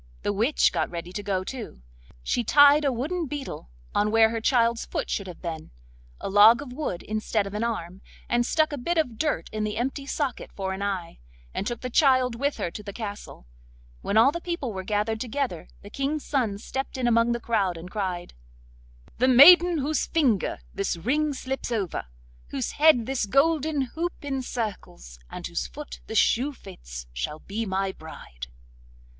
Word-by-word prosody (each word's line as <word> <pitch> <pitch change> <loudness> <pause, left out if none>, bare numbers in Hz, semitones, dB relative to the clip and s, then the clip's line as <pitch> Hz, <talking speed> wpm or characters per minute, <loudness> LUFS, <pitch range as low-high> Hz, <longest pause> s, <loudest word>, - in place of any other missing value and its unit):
The 205 - 0
witch 230 +9 +3
got 165 -3 0
ready 170 0 -6
to 205 - -3
go 195 -2 -1
too. 220 - -8 0.4
She 240 - 0
tied 290 +4 +6
a 280 - +2
wooden 310 +8 -2
beetle 270 - -6 0.2
on 210 +1 +2
where 225 0 +5
her 225 -1 -3
child's 235 -1 +2
foot - - -4
should 200 - -2
have 180 0 -10
been, 160 -2 -5 0.5
a - - -5
log 210 +5 +7
of 275 -3 -8
wood 255 - -4
instead 215 -1 -1
of 200 - -7
an 210 +2 -2
arm, 190 -5 -4 0.3
and 240 0 +2
stuck 310 +4 +1
a 285 - -4
bit 340 +7 -1
of 250 -9 0
dirt 300 - 0
in 215 0 -2
the 215 0 -2
empty 270 +3 -3
socket 280 -3 -3
for 190 -1 -3
an 190 - -6
eye, 190 -4 -3 0.3
and 200 - -3
took 240 -2 -4
the 255 - -4
child 255 -3 +4
with 280 +5 -1
her 170 - -3
to 210 - -7
the 205 -1 -7
castle. 205 - -7 0.6
When 210 - 0
all 230 +5 +7
the 340 - -5
people 340 -10 -3
were 190 - -4
gathered 215 +2 -1
together, 250 - -3 0.2
the 205 - -11
King's 280 +4 -2
son 235 -8 0
stepped 265 +5 -5
in 250 -2 0
among 230 0 +3
the 235 - -2
crowd 200 -7 0
and 175 +3 -9
cried: 185 -4 -3 0.9
'The 255 - +4
maiden 340 +7 +8
whose 295 +1 0
finger 260 - +1
this 195 -3 -2
ring 290 - 0
slips 265 -2 -4
over, 200 - -2 0.4
whose 130 - -3
head 300 -6 +5
this 260 -5 -1
golden 300 +4 +2
hoop 345 +2 -2
encircles, 225 - -5
and - - -7
whose 65 - -3
foot - - -9
this - - -2
shoe 270 +5 +3
fits, - - -10
shall 65 - -3
be 210 +7 -5
my 190 0 -1
bride. - - -10
230 Hz, 185 wpm, -26 LUFS, 195-275 Hz, 0.9 s, maiden